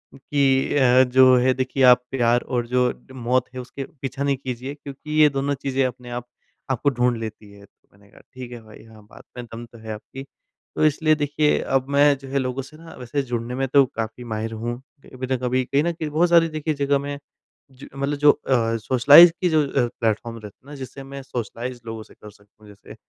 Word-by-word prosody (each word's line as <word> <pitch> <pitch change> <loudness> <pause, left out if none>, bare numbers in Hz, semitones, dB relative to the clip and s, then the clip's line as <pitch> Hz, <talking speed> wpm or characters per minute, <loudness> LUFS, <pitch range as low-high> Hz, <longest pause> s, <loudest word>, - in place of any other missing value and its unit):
कि 135 -1 +1
अ, 130 -1 +5
जो 130 0 +5
है 130 +1 +3
देखिए 130 +1 -1
आप 125 -1 +6
प्यार 120 -2 +2
और 120 -2 -3
जो 125 0 +2 0.3
मौत 125 +1 0
है 130 - -6
उसके 130 +2 -8 0.2
पीछा 135 +1 -4
नहीं 140 -1 0
कीजिए, 130 +1 -6
क्योंकि 150 +2 -3
ये 150 - +7
दोनों 140 0 -1
चीज़ें 135 0 -1
अपने 125 -1 -6
आप 120 0 -6 0.4
आपको 130 +3 +1
ढूँढ 125 -2 0
लेती 110 -2 -8
है। 100 0 -15
तो 100 - -36
मैंने 100 0 -23
कहा - - -18
ठीक 125 -1 -9
है 120 -1 -9
भाई, 110 -1 -15
हाँ, 110 -1 -17
बात - - -15
में 120 - -6
दम 115 +1 -9
तो 120 0 -17
है 110 -1 -8
आपकी। 130 +5 -10 0.5
तो - - +2
इसलिए 155 +1 +3
देखिए 150 0 +1
अब 135 -1 -1
मैं 145 0 +4
जो 135 0 -12
है 140 - -1
लोगों 130 0 -3
से 145 +4 -14
ना 165 +1 -13
वैसे 125 +3 -2
जुड़ने 120 -1 -4
में 135 +1 -1
तो 140 +1 +5
काफ़ी 115 0 -6
माहिर 110 -1 -4
हूँ। 120 +2 -4 0.3
कभी 130 0 -7
न - - -2
कभी 125 +1 0
कहीं 140 +3 +1
न 170 - 0
कहीं 160 -2 -5
बहुत 165 +4 +2
सारी 170 -1 +5
देखिए 155 0 -2
जगह 140 -1 +1
में 140 +1 -5 0.5
ज 130 +1 -13
मतलब 140 +1 -2
जो 145 0 +6
अ, 115 -5 0
सोशलाइज़ 135 +9 +7
की 180 - +2
जो 155 -2 +3
अ, 135 -3 0
प्लेटफ़ॉर्म 115 +1 -1
रहते 105 -2 -12
हैं 135 - -23
ना 145 - -9
जिससे 135 0 -9
मैं 140 +1 -9
सोशलाइज़ 120 0 -6
लोगों 115 -1 -6
से - - -19
कर 105 - -14
सकता 100 +1 -26
हूँ, - - -15
जैसे 100 -1 -14
130 Hz, 225 wpm, -22 LUFS, 120-140 Hz, 0.5 s, ये